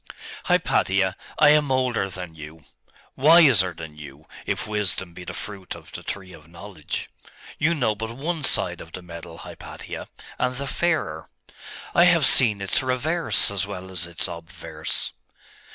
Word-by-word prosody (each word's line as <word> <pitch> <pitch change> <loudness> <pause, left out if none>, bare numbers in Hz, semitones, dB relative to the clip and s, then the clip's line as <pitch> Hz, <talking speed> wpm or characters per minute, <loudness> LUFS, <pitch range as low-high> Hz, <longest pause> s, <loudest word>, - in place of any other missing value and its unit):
'Hypatia, 95 -1 +2 0.2
I 150 -1 +7
am 150 -2 +4
older 125 -6 +1
than 90 -3 -7
you 80 0 -11 0.5
wiser 135 - +6
than 80 -2 -9
you, 75 +1 -11 0.2
if - - -1
wisdom 100 -4 -1
be 90 - -9
the - - -6
fruit 100 -3 -7
of - - -14
the - - -7
tree 95 -2 -6
of 75 -2 -14
knowledge. 85 -1 -6 0.5
You 160 +3 +3
know 120 -8 +1
but 110 +2 -5
one 160 +2 -2
side - - +2
of - - -12
the 90 - -7
medal, 85 -1 -9
Hypatia, - - -8 0.3
and 125 0 0
the 140 +2 -4
fairer; 140 - -1 0.6
I 170 - +6
have 170 -5 +5
seen 110 -7 +5
its 95 - 0
reverse 130 +3 +2
as 100 -1 -2
well 95 -2 -7
as 90 -2 -2
its 85 -1 -3
obverse. 80 -2 -5
100 Hz, 155 wpm, -24 LUFS, 85-130 Hz, 0.6 s, I